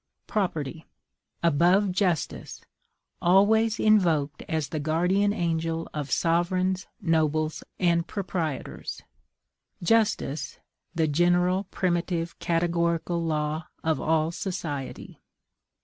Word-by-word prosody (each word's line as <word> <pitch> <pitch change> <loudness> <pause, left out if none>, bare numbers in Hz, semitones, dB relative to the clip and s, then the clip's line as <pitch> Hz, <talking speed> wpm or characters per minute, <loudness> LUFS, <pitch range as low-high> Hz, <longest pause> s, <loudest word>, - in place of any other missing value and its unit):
PROPERTY 165 - -2 0.6
above 175 +5 +4
JUSTICE, 180 -4 -1 0.6
always 215 +5 +4
invoked 165 -9 +3
as 155 -4 -1
the 155 - -3
guardian 180 +7 +2
angel 165 -4 -1
of 145 -2 -4
sovereigns, 180 +4 +1
nobles, 155 -4 0 0.2
and 170 -2 +2
proprietors; 175 -7 -4 0.8
JUSTICE, 170 -8 +1 0.4
the 160 -1 +2
general, 175 +5 +2
primitive, 175 -2 -2
categorical 170 0 0
law 155 0 -1 0.2
of 160 -1 0
all 160 0 +1
society. 160 -7 -5
170 Hz, 85 wpm, -26 LUFS, 155-185 Hz, 0.8 s, above